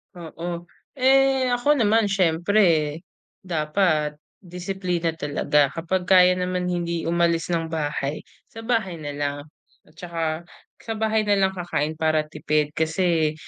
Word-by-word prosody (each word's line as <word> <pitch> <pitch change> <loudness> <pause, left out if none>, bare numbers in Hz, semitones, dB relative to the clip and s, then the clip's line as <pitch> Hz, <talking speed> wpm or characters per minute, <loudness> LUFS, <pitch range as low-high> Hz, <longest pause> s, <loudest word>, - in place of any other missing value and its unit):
Oo, 170 0 -7 0.2
eh, 265 -1 +3
ako 245 +5 +2
naman 225 -4 +3
siyempre 170 -4 +2 0.4
dapat 155 -3 0 0.2
disiplina 180 -1 -3
talaga 145 -1 +1
kapag 180 +2 -2
kaya 180 -1 +6
naman 180 0 -2
hindi 170 -1 -2
umalis 170 -1 +1
ng 165 -1 0
bahay 150 -2 -3 0.2
sa 225 - -11
bahay 225 -5 -1
na 145 - -5
lang, 145 0 -3 0.5
at 155 - -25
saka 170 -1 -6 0.6
sa 225 - -5
bahay 220 0 0
na 205 - +3
lang 190 -1 +3
kakain 160 -3 -2
para 155 -1 +1
tipid 150 -1 0
kasi 160 -1 +1
175 Hz, 130 wpm, -23 LUFS, 155-195 Hz, 0.6 s, kaya